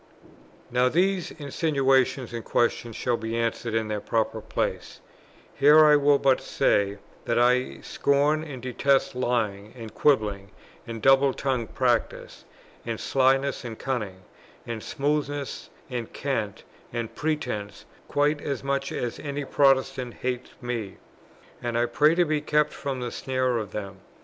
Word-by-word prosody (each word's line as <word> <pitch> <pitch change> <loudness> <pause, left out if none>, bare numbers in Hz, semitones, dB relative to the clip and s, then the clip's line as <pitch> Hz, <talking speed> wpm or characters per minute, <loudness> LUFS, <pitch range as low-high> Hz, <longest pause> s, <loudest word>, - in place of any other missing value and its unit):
Now 125 +1 +3
these 185 +3 +1
insinuations 135 -4 +1
and 115 -1 -4
questions 120 -1 0
shall 120 0 0
be 115 0 -3
answered 115 0 -1
in 110 -1 0
their 105 -1 -3
proper 110 +1 -1
places; - - -3 0.5
here 150 +2 +7
I 150 -1 +7
will 145 0 +4
but 135 -2 +3
say 100 0 +1 0.3
that 115 - 0
I 125 +1 +2
scorn 145 +2 +1
and 135 -6 -8
detest 135 +2 +1
lying, 110 -5 -1
and 115 -2 -8
quibbling, 105 -8 +1 0.4
and 115 -2 -6
double 135 0 +5
tongued 130 -5 -2
practice, 120 -3 -1 0.4
and 115 -2 -4
slyness, 135 +1 +2
and 115 -3 -6
cunning, 105 -8 -4 0.4
and 115 -2 -5
smoothness, 145 0 -2 0.2
and 120 -3 -5
cant, 110 -7 -3 0.3
and 115 -1 -4
pretence, 125 -10 -3 0.2
quite 145 +1 +1
as 140 -2 -3
much 140 0 -1
as 120 -1 -3
any 145 -1 -4
Protestants 135 -3 +2
hate 125 -1 -2
them; 115 -6 -4 0.6
and 120 -1 -2
I 120 - +3
pray 150 +7 +3
to 175 0 +3
be 155 -1 0
kept 150 0 +1
from 135 -3 -4
the 120 -1 -3
snare 130 -2 -1
of 105 - -6
them. 100 -2 -6
130 Hz, 145 wpm, -26 LUFS, 115-140 Hz, 0.6 s, here